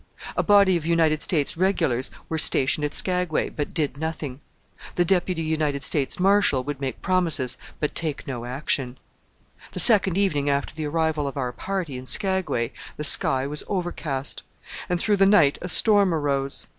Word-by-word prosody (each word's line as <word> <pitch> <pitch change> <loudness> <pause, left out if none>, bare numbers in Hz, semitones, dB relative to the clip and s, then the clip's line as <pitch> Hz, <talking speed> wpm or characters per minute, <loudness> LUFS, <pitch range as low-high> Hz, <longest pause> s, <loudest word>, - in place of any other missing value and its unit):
A - - +1
body 200 -3 +4
of 165 - -6
United 160 -2 +2
States 150 -5 -1
Regulars 165 -9 0 0.2
were 160 - -3
stationed 140 0 +2
at 145 - -2
Skagway, 180 -3 0
but 145 - -5
did 150 -5 -2
nothing. 155 -4 -5 0.5
The 175 - +2
Deputy 180 -2 0
United 155 -3 -1
States 140 +3 0
Marshal 195 -8 +3
would 145 0 -6
make 130 -3 -5
promises, 170 -9 0 0.2
but 150 - -2
take 155 -4 -4
no 120 -3 -6
action. 130 0 -2 0.8
The - - -4
second 195 -6 +5
evening 150 -8 0
after 140 0 -1
the 155 0 -5
arrival 160 -1 -1
of 140 - -6
our 125 -2 -2
party 175 -4 -5
in 130 - -10
Skagway 190 - +2 0.3
the 150 - -4
sky 135 -2 +4
was 150 +2 0
overcast, 165 -7 -4 0.5
and 180 -1 0
through 205 +2 +1
the 195 0 +4
night 165 -9 +4
a - - -5
storm 200 -3 +4
arose. 140 -2 -2
155 Hz, 170 wpm, -23 LUFS, 140-180 Hz, 0.8 s, second